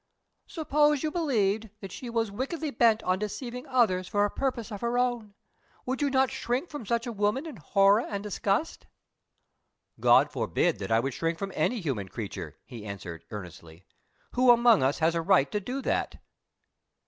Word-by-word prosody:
"Suppose 300 -3 +2
you 310 - 0
believed 225 - 0
that 195 -2 -8
she 245 - -7
was 225 -3 -1
wickedly 285 +8 -3
bent 225 -2 +3
on 185 0 +1
deceiving 245 +5 -5
others 220 -9 +2
for 205 0 +2
a 205 - -2
purpose 245 -4 -2
of 205 - -6
her 235 +1 0
own 240 -5 -1 0.5
would 260 +2 -2
you 285 - +2
not 265 -1 +2
shrink 265 +4 -2
from 290 -8 -7
such 235 +1 0
a 240 - -3
woman 210 +7 0
in 305 -8 -8
horror 195 +5 +4
and 200 -4 -5
disgust?" 205 - -2 1.1
"God - - +5
forbid 175 - 0
that 100 +1 -5
I 115 +1 +4
should 135 -1 -2
shrink 165 +4 -1
from 195 +1 -4
any 240 -3 0
human 120 - -3
creature!" 100 -1 -6
he 115 -4 -9
answered, 90 -5 -7
earnestly. 90 -4 -10 0.5
"Who 250 0 +3
among 235 -2 +6
us 135 +2 +2
has 160 +1 +2
a 165 - 0
right 165 -5 +3
to 210 - 0
do 255 +7 -5
that?" - - -1
215 Hz, 180 wpm, -28 LUFS, 175-255 Hz, 1.1 s, among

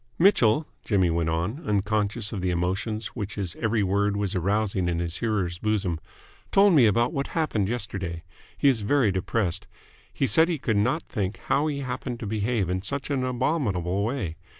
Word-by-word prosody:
"Mitchell," 155 - +4 0.2
Jimmy 95 -5 +2
went 85 0 0
on, 90 - -2
unconscious 105 +1 0
of 100 - -3
the 90 - 0
emotions 95 +5 -1
which 105 -3 -4
his 95 -5 -3
every 110 -2 +1
word 100 +1 +1
was 100 -1 -1
arousing 95 0 0
in 85 - 0
his 85 0 -3
hearer's 95 -7 -1
bosom, 100 -6 0 0.5
"told 195 -1 +6
me 130 -8 +6
about 120 +4 +2
what 140 0 -1
happened 115 - 0
yesterday. 95 -8 -4 0.3
He 145 - +3
is 125 -5 +3
very 115 0 +3
depressed. 95 -1 -1 0.4
He - - 0
said 160 +9 +4
he 170 - 0
could 115 -5 -1
not 130 +11 +1
think 100 -1 -3
how 145 +2 +2
he 140 -2 -2
happened 125 -2 -4
to - - -4
behave 105 -1 0
in 90 +1 -1
such 140 +7 -3
an 135 -2 0
abominable 120 - 0
way. 105 - -2
105 Hz, 180 wpm, -26 LUFS, 95-125 Hz, 0.5 s, told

